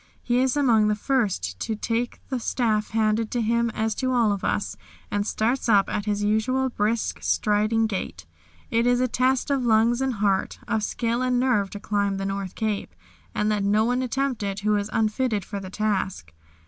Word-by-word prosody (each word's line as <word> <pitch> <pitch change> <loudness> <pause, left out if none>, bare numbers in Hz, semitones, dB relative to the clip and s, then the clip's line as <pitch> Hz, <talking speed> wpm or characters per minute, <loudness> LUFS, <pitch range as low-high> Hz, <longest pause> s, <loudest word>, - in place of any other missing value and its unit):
He 245 0 +1
is 260 +2 +2
among 230 -7 +4
the 210 - +2
first 200 - -1
to 220 - -2
take 230 +3 -2
the 260 -2 -1
staff, 220 -3 0
handed 220 0 +1
to 245 - -2
him 235 +1 +1
as 220 0 -1
to 255 +3 -1
all 235 -4 +3
of 200 -2 -3
us, 205 - -1 0.4
and 205 0 -1
starts 235 +4 0
up 200 -3 +4
at 205 - -2
his 205 -1 -1
usual 255 +5 +1
brisk, 220 0 -1
striding 215 +2 +2
gait. 205 -4 -4 0.5
It 230 +1 +2
is 245 0 +3
a 255 - +2
test 255 +3 +1
of 275 -2 +1
lungs 230 +2 +3
and 265 -1 0
heart, 200 -2 0
of 220 -2 0
skill 235 +3 -1
and 250 -1 +1
nerve 245 -6 +2
to 205 - -7
climb 200 -1 0
the 195 - -3
North 195 -1 -4
Cape, 210 - -3 0.4
and 210 - +1
let 210 -2 0
no 210 +2 +3
one 250 +2 +1
attempt 260 -1 -1
it 195 -1 -3
who 210 +1 +2
is 205 0 -1
unfitted 220 -2 0
for 200 - -5
the 190 -1 -8
task. 190 - -2
220 Hz, 200 wpm, -25 LUFS, 205-245 Hz, 0.5 s, among